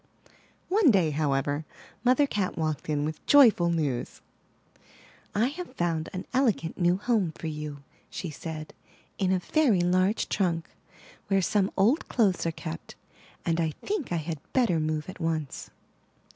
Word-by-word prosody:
One 390 -4 +4
day, 185 -9 +4
however, 145 0 0 0.4
Mother 255 +3 +4
Cat 205 -8 -2
walked 155 -2 -2
in 145 -1 0
with 155 0 -5
joy 280 -5 +8
ful 175 -4 0
news. 150 -7 -2 1.2
I 215 +3 +3
have 305 -3 -8
found 165 -4 -1
an 185 0 -5
elegant 230 -11 +1
new 175 0 +3
home 205 -6 0
for - - -8
you," 150 -2 -5 0.3
she 175 - -5
said, 155 0 -7 0.5
*'in 190 -2 +2
a 190 - +3
very 225 - +2
large 185 +4 +2
trunk 170 -4 0 0.6
where 195 -1 +3
some 200 0 +1
old 225 - +3
clothes 195 -8 +2
are - - +1
kept; 80 - -7 0.5
and 165 0 +1
I 160 -2 -1
think 400 - -2
I - - +1
had 160 -1 -3
better 225 -11 +3
move 155 -1 -2
at 185 - -9
once.'' 160 -4 -3
175 Hz, 155 wpm, -27 LUFS, 155-210 Hz, 1.2 s, joy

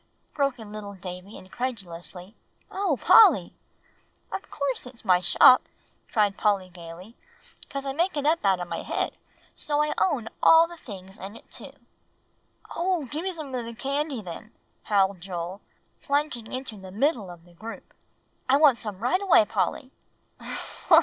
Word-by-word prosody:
broke 275 -3 0
in 220 -3 -10
little 205 -1 -7
Davie 180 +2 -8
incredulously. 190 -4 -6 0.4
"O 380 -8 0
Polly!" 450 -1 +6 0.8
"Of - - -5
course 275 -3 -2
it's 245 -3 -9
my 180 -2 +5
shop," 220 +7 +7 0.5
cried 205 -3 +2
Polly 200 -3 +1
gayly, 175 +5 -11 0.5
"'cause 275 -1 -5
I 270 - -2
make 340 +3 0
it 290 - -1
up 320 +2 +2
out 190 -2 +3
of 175 - -4
my - - -4
head, - - -2 0.4
so 295 0 0
I 300 - -1
own 275 -11 +1
all 325 +1 +7
the 345 - -10
things 195 - -11
in 195 +3 -8
it - - -16
too." - - -9 1.0
"Oh! 345 -2 0
give 305 +2 -2
me 380 +2 -2
some 310 -6 -7
of 250 -2 -2
the 230 0 -8
candy 275 -1 -2
then," 185 +5 -9 0.3
howled 195 -3 +2
Joel, 180 +1 -5 0.4
plunging 280 -6 -1
into 255 -4 -5
the 190 -1 -10
middle 220 - 0
of 175 -1 -12
the 175 - -19
group. 225 +6 -10 0.6
"I 270 - +6
want 285 -5 +5
some 210 -3 -5
right 350 - +1
away, 370 - +5
Polly." 260 +5 -2
230 Hz, 160 wpm, -26 LUFS, 190-290 Hz, 1.0 s, shop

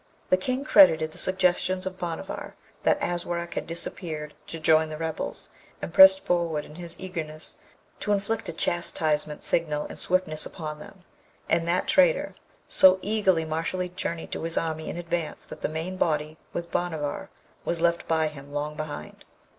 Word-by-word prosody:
The - - +8
King 255 +8 -2
credited 160 - +6
the - - -6
suggestions 185 0 +1
of 185 0 -5
Bhanavar, 170 -2 -5 0.3
that - - +3
Aswarak 175 0 -2
had - - -3
disappeared 160 -2 -4
to 165 - -5
join 155 0 +4
the 155 - -5
rebels, 160 0 -4 0.3
and 165 - -6
pressed 190 +1 +9
forward 165 -4 0
in - - -12
his 170 +1 -7
eagerness 160 -5 -6 0.4
to 210 - -1
inflict 205 +2 0
a - - -4
chastisement 155 -3 -1
signal 150 -3 0
in - - -8
swiftness 175 -4 0
upon 155 -2 -6
them 185 +4 -13 0.4
and 165 0 +1
that 175 +2 +1
traitor; - - +4 0.3
so 190 0 +6
eagerly 195 -6 +2
Mashalleed 175 +3 -2
journeyed 170 -3 -4
to - - -3
his 165 0 -2
army 160 -1 -2
in - - -5
advance, 170 -2 -3
that - - -10
the - - 0
main 165 +4 -4
body, 155 -2 0
with 170 0 -5
Bhanavar, 160 -5 -2 0.3
was 170 - -1
left 170 0 +1
by 160 -1 +2
him 145 -2 -9
long 150 +1 -3
behind. 155 -1 -7
170 Hz, 165 wpm, -27 LUFS, 155-185 Hz, 0.4 s, pressed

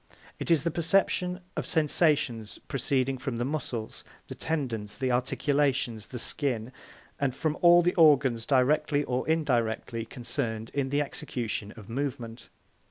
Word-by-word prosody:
It - - -4
is 160 -4 +4
the 170 - 0
perception 180 +2 +1
of - - -3
sensations 150 - +1
proceeding 135 -1 0
from 130 -2 -3
the 120 - -1
muscles, 125 -6 -4 0.3
the - - -5
tendons, 120 -10 -3
the 130 -1 0
articulations, 130 -3 0
the 125 - -7
skin, 125 -2 -1 0.5
and 135 -3 0
from 155 0 -1
all 175 0 +7
the 180 - +2
organs 135 -8 +4
directly 145 +2 +2
or 125 -2 -2
indirectly 120 -7 0
concerned 115 -2 -4
in 140 -2 -1
the 145 +2 +1
execution 115 -6 -4
of 105 -3 -11
movement. 120 -2 -4
135 Hz, 140 wpm, -28 LUFS, 120-150 Hz, 0.5 s, all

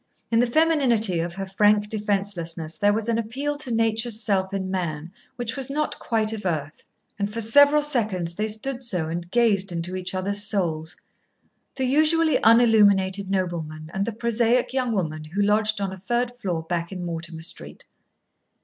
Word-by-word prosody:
In 230 - +3
the 245 - +3
femininity 240 - +2
of 170 +1 -3
her 195 0 -4
frank 205 +2 +2
defencelessness 195 -6 -3
there 205 0 +2
was 220 +1 -1
an 230 -1 +1
appeal 265 +6 -3
to 260 -4 -5
nature's 225 0 +1
self 195 -4 0
in 190 -1 -3
man 170 -3 -3 0.2
which 240 -1 -4
was 270 -1 -3
not 300 +2 -2
quite 220 -1 +1
of 220 - -6
earth. 155 -4 -4 0.3
And 200 +1 -2
for 230 - -5
several 285 +6 +5
seconds 210 - 0
they 210 +5 -2
stood 240 +4 -5
so 180 -10 0
and 170 +1 -5
gazed 200 -3 +2
into 175 +2 -4
each 185 0 -4
other's 200 +2 +1
souls 170 -7 -1 0.8
the 265 - -1
usually 310 +4 +4
unilluminated 205 -4 +4
nobleman 165 -5 -3
and 195 - -1
the - - -1
prosaic 235 +2 0
young 255 -2 0
woman 160 -7 -2
who 165 +7 -3
lodged 215 +1 +1
on 195 -1 -3
a - - -8
third 240 +6 -2
floor 180 -9 -3
back 170 +1 -3
in 180 -2 -5
Mortimer 165 -1 -6
Street. - - -3
205 Hz, 175 wpm, -24 LUFS, 180-235 Hz, 0.8 s, several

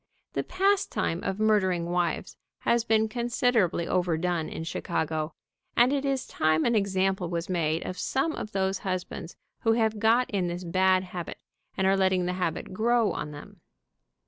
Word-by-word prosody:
The - - 0
pastime 380 - +1
of 190 +2 -2
murdering 190 -5 +2
wives 175 -2 -1 0.3
has 235 -1 +2
been 220 -1 +3
considerably 235 -6 +1
overdone 175 -2 0
in - - -5
Chicago, 160 -1 -2 0.4
and 245 +3 +5
it 280 -1 0
is 270 -2 0
time 155 0 +1
an 235 - +3
example 190 -3 +1
was 170 0 -3
made 165 -3 0
of 180 - -5
some 270 - 0
of 215 - -6
those 190 0 0
hus 185 -2 -2
bands 165 - -9 0.2
who 225 - +3
have 220 -2 +1
got 230 +3 +4
in 190 -4 0
this 175 +1 -4
bad 185 +1 +3
habit, 180 -2 -6 0.4
and 190 - +1
are 195 +1 +4
let 190 -1 +3
ting 185 -1 +1
the 180 - -1
habit 180 -1 -3
grow 230 0 +2
on 150 - -4
them. 145 0 -11
190 Hz, 170 wpm, -27 LUFS, 175-225 Hz, 0.4 s, and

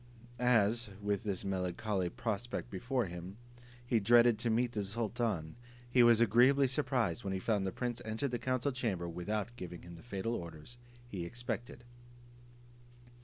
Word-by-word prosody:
As, 120 -2 +3
with 100 -1 -1
this 100 -3 -3
melancholy 95 0 -1
prospect 115 +4 -3
before 120 +5 -1
him, 90 +2 -7 0.5
he 120 -1 +2
dreaded 120 +1 +5
to 120 0 0
meet 120 +2 +2
the 105 -3 -2
sultan, 110 -5 -2 0.3
he 125 +1 +4
was 120 -1 +7
agreeably 125 +5 +5
surprised 130 - 0
when 95 - -2
he 95 - -1
found 100 -1 0
the - - -1
prince 120 +1 -3
entered 110 +5 -2
the 120 - -1
council 130 +3 0
chamber 110 -9 -2
without 105 +7 -3
giving 90 -4 -7
him 85 0 -10
the 85 - -11
fatal 115 0 -3
orders 85 +3 -7 0.3
he 95 -7 -5
expected. 120 +4 -5
110 Hz, 155 wpm, -34 LUFS, 95-120 Hz, 0.5 s, was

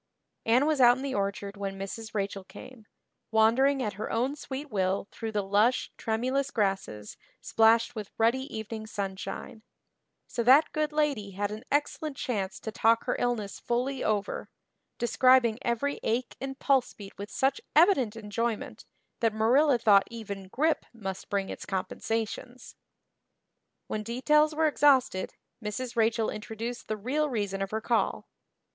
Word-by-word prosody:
Anne 245 +5 +4
was 305 -3 +2
out 245 0 +7
in 260 - -6
the 275 -1 -2
orchard 200 -1 -2
when 195 -1 -4
Mrs. 215 +3 -6
Rachel 195 -1 -2
came, 220 +3 -13 0.4
wandering 255 +5 +3
at 210 -3 -2
her - - -3
own 255 +5 0
sweet 280 -1 -7
will 190 -1 0
through 225 -1 -5
the 210 -2 -1
lush, 210 +6 +2
tremulous 255 +5 -1
grasses 195 - -2 0.2
splashed 225 +1 +3
with 215 -4 -6
ruddy 260 +5 +1
evening 220 0 -6
sunshine; 195 +2 -5 0.7
so 235 - -2
that 265 +6 +6
good 305 0 -1
lady 285 -10 0
had 205 +2 -2
an 215 +3 -7
excellent 290 0 -1
chance 195 -6 -3
to 220 - -5
talk 225 +1 +3
her - - -1
illness 230 -5 -1
fully 250 +2 -1
over, 205 -2 -1 0.5
describing 240 -1 +4
every 240 +3 -1
ache 235 +3 -1
and 270 0 -5
pulse 270 -3 +2
beat 200 -2 -11
with 200 +1 -6
such 270 +1 0
evident 295 - +4
enjoyment 225 +1 -3 0.3
that 225 -2 +1
Marilla 255 +5 +4
thought 205 -4 +5
even 205 -4 -7
grippe 310 +8 +1
must 195 -5 -6
bring 200 -1 -1
its - - -6
compensations. 225 +5 -4 1.1
When 215 - -3
details 300 +7 +2
were 320 +1 +2
exhausted 275 -10 +3 0.3
Mrs. 235 +4 -4
Rachel 225 0 +2
introduced 225 +2 -6
the 215 - -2
real 290 +8 0
reason 205 -5 -2
of 195 - -2
her 220 +1 -3
call. 230 -1 0
225 Hz, 150 wpm, -28 LUFS, 205-260 Hz, 1.1 s, out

